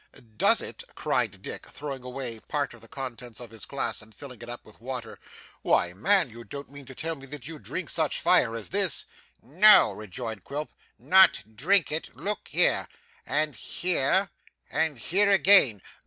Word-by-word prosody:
'Does - - +4
it?' - - -6
cried - - -2
Dick, - - -7
throwing 140 -3 -7
away 125 -3 -6
part 145 -2 -2
of 120 - -15
the 115 - -14
contents 125 -3 -8
of 120 -3 -10
his 115 -3 -8
glass, - - -3
and 110 -1 -17
filling 125 -3 -11
it 120 - -10
up 120 - -9
with 110 - -18
water, 125 -2 -7 0.4
'why, 90 - +1
man, 185 - +4
you 120 0 -12
don't 140 +6 -9
mean 140 -2 -13
to 130 - -11
tell 165 +4 -2
me 135 -2 -13
that 140 -2 -7
you 160 -2 -8
drink - - -5
such - - 0
fire 115 - +3
as 115 - -5
this?' 195 -2 +2 0.4
'No!' 185 - +6
rejoined 110 0 -7
Quilp, 150 +2 -6 0.3
'Not 185 - +4
drink 175 - +2
it! 155 +2 -4
Look 210 +1 -4
here. - - +2 0.4
And 155 -1 +1
here. 180 - +1 0.4
And 160 -4 0
here 195 - +1
again. 190 - +5
135 Hz, 175 wpm, -26 LUFS, 115-160 Hz, 0.4 s, No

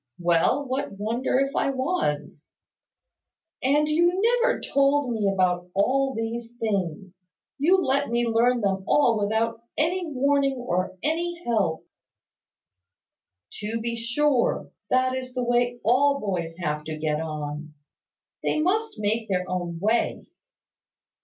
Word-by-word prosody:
"Well, 175 +10 +2
what 260 -3 -2
wonder 230 +5 0
if 275 +1 -1
I - - +1
was?" 260 - -2 1.1
"And 290 +3 +3
you 345 +4 +2 0.2
never - - +2
told 275 -1 +2
me 215 -3 +1
about 180 -2 0
all 265 +6 +2
these 230 +1 -4
things. 190 -3 -3 0.4
You 355 +7 +4
let 280 -4 +1
me 235 +1 +1
learn 235 +2 +2
them 195 -2 0
all 235 -7 +3
without 225 +2 0 0.2
any 345 +3 0
warning, 280 -1 +1
or 185 -7 -2
any 340 +2 -1
help." 195 -9 0 1.7
"To 220 +2 -3
be 235 +1 -3
sure. 240 +3 +1 0.2
That 255 0 +2
is 255 -1 -5
the 250 - -1
way 245 0 +1
all 280 +5 +3
boys 175 -6 -3
have 150 -4 -2
to 155 -1 -5
get 155 0 -1
on. 150 -1 -5 0.7
They - - 0
must 405 - 0
make 215 +1 -1
their 180 -1 0
own 175 -2 -3
way." 220 +5 0
235 Hz, 130 wpm, -25 LUFS, 190-275 Hz, 1.7 s, You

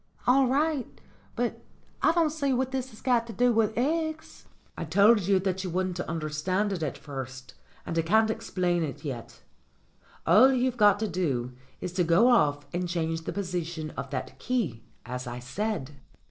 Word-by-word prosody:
"All 260 +2 +5
right. 285 +1 0 0.4
But 240 0 -2 0.4
I - - +5
don't 330 -3 +2
see 280 -3 0
what 260 +1 0
that's 260 -4 -5
got 240 -3 +2
to 230 - -7
do 245 +1 +3
with 220 -1 +1
eggs." 315 +4 -2 0.3
"I - - -4
told 200 +4 +4
you 200 -1 +4
that 190 0 -1
you 185 - -3
wouldn't 185 0 -2
understand 170 +5 -1
it 180 - -4
at 150 -4 -2
first, 130 -2 -8 0.3
and 165 - -4
I - - +4
can't 220 +6 +3
explain 180 -6 -1
it 155 -1 -4
yet. 125 -5 -6 0.8
All 220 +10 +7
you've 255 -1 +1
got 205 -2 +5
to 220 - +1
do 140 -10 -1 0.3
is 180 - -4
to 180 -1 +2
go 170 +9 +5
off 145 - +3
and 175 0 -2
change 165 -1 -2
the - - -2
position 170 -5 -4
of 135 - -6
that 135 - -5
key, 195 - -1 0.2
as 125 +1 -5
I 120 0 -5
said." 145 - -3
185 Hz, 175 wpm, -28 LUFS, 160-240 Hz, 0.8 s, All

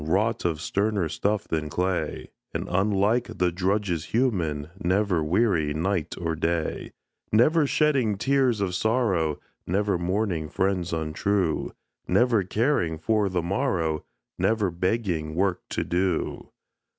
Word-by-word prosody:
Wrought 100 +8 0
of 80 -3 0
sterner 100 +1 0
stuff 100 +6 -1
than 80 -1 -2
clay; 90 +4 -2 0.2
And, - - -2
unlike 100 +5 +1
the 90 -1 +2
drudges 90 -2 0
human, 85 - 0
Never 90 -2 +2
weary 80 -4 +1
night 85 0 -1
or 80 -1 -1
day; 80 0 -2 0.4
Never 145 +8 +4
shedding 135 -9 +2
tears 130 -1 +2
of 95 -2 -1
sorrow, 95 - +1 0.3
Never 100 0 +1
mourning 90 -3 -1
friends 95 0 0
untrue, 85 +2 -1 0.3
Never 120 -3 +3
caring 95 - 0
for 105 +5 +1
the 90 -2 -1
morrow, 85 - 0 0.4
Never 105 -4 +1
begging 85 -4 -1
work 90 0 +1
to - - -1
do. 90 -1 -1
95 Hz, 125 wpm, -26 LUFS, 85-105 Hz, 0.4 s, Never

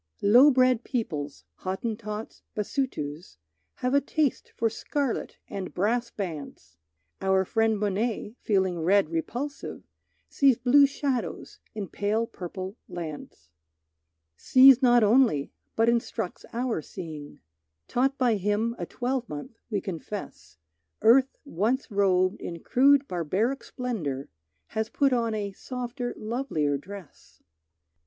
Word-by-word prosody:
Low 245 +8 +8
bred 255 -3 +3
peoples, 150 - -3
Hottentots, 215 +2 -5
Basutos, 180 - -3 0.4
Have 250 +1 -1
a 280 - +5
taste 295 -1 -1
for 230 - +1
scarlet 270 +3 -2
and 190 -2 -6
brass 235 +6 +1
bands. 150 - -7 0.5
Our 190 0 +2
friend 225 +1 +1
Monet, 210 +2 -1
feeling 190 -4 +1
red 185 0 +3
repulsive, 245 - -4 0.4
Sees 270 -4 +3
blue 270 +3 +6
shadows 275 -3 -3 0.2
in 205 -3 -4
pale 210 +5 0
purple 185 +1 -7
lands. 155 - -8 0.9
Sees 260 0 +7
not 240 -2 +5
only, 215 - +3 0.2
but 225 +1 +3
instructs 235 -6 -1
our 235 -6 -1
seeing; 155 -3 -8 0.5
Taught 270 +3 +1
by 240 -4 +2
him 210 +4 0
a 175 - -4
twelvemonth, 245 - -4
we 205 -4 -1
confess 165 - -7 0.5
Earth 260 +4 +5
once 245 - -1
robed 190 0 +2
in 170 -1 -6
crude 280 +2 +4
barbaric 190 - -1
splendor, 165 - -4 0.4
Has 220 0 -2
put 275 +2 +2
on 230 -2 +1
a 205 -2 -3
softer 245 +3 -5
lovelier 215 - -1
dress. 190 +4 -11
220 Hz, 115 wpm, -27 LUFS, 185-250 Hz, 0.9 s, Low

